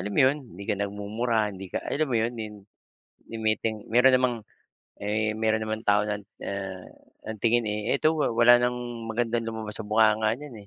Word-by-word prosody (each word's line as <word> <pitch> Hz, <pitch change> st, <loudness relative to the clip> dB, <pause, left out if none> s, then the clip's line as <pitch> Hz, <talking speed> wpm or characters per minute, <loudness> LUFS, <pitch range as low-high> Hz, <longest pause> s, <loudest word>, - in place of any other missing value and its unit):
alam 100 Hz, +3 st, -4 dB
mo -, -, +3 dB
'yon, 135 Hz, +3 st, +4 dB, 0.2 s
hindi 100 Hz, -, -8 dB
ka -, -, +2 dB
nagmumura, 105 Hz, +4 st, -1 dB
hindi 95 Hz, 0 st, -8 dB
ka, -, -, -1 dB
alam 155 Hz, +2 st, 0 dB
mo 120 Hz, -, +2 dB
'yon, 115 Hz, +2 st, 0 dB
ni 110 Hz, -, -3 dB, 0.9 s
ni -, -, -5 dB
ngiting 110 Hz, 0 st, -1 dB
meron 125 Hz, +3 st, +5 dB
namang, 125 Hz, -1 st, +2 dB, 0.7 s
eh, 110 Hz, +1 st, 0 dB
meron 110 Hz, 0 st, +1 dB
namang 110 Hz, 0 st, -3 dB
tao 105 Hz, 0 st, +3 dB
na, 105 Hz, -1 st, -2 dB, 0.2 s
ah, 95 Hz, -2 st, -5 dB, 0.4 s
ang 110 Hz, -1 st, -5 dB
tingin, 120 Hz, 0 st, +3 dB
eh, 105 Hz, +5 st, 0 dB
"Eto 155 Hz, +3 st, +3 dB
wa 155 Hz, -, +1 dB
wala 120 Hz, +1 st, +6 dB
ng 120 Hz, -2 st, -3 dB
magandang 115 Hz, 0 st, 0 dB
lumabas 110 Hz, -1 st, -5 dB
sa -, -, -5 dB
bunganga 110 Hz, 0 st, +3 dB
niyan, 145 Hz, -1 st, -10 dB
110 Hz, 190 wpm, -26 LUFS, 105-120 Hz, 0.9 s, wala